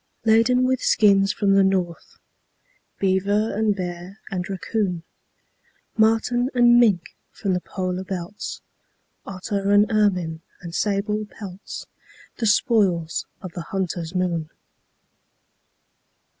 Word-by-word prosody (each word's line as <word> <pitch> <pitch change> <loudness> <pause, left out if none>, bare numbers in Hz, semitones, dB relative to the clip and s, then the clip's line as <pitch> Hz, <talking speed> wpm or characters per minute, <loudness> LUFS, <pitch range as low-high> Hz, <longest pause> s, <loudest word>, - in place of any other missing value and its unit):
Laden 230 +3 +4
with 260 0 +1
skins 195 -2 +4
from 200 -2 +1
the 195 0 +5
north, 185 -3 -1 0.8
Beaver 200 +3 +1
and 215 -1 +1
bear 180 +1 -6
and 180 -1 -3
raccoon, 190 -2 -2 0.9
Marten 225 +3 +2
and 240 -1 +6
mink 200 -8 +2
from 195 -3 -2
the 180 - -1
polar 185 0 -3
belts, 185 +1 -6 0.7
Otter 195 +1 -3
and 205 +1 +6
ermine 180 -7 +1 0.2
and 170 -2 -9
sable 210 +2 -1
pelts 195 -3 -9 0.5
The 230 - 0
spoils 200 - +2 0.2
of 185 - -6
the 170 - -6
hunter's 175 -1 -4
moon. 170 -4 -1
195 Hz, 110 wpm, -23 LUFS, 180-215 Hz, 0.9 s, and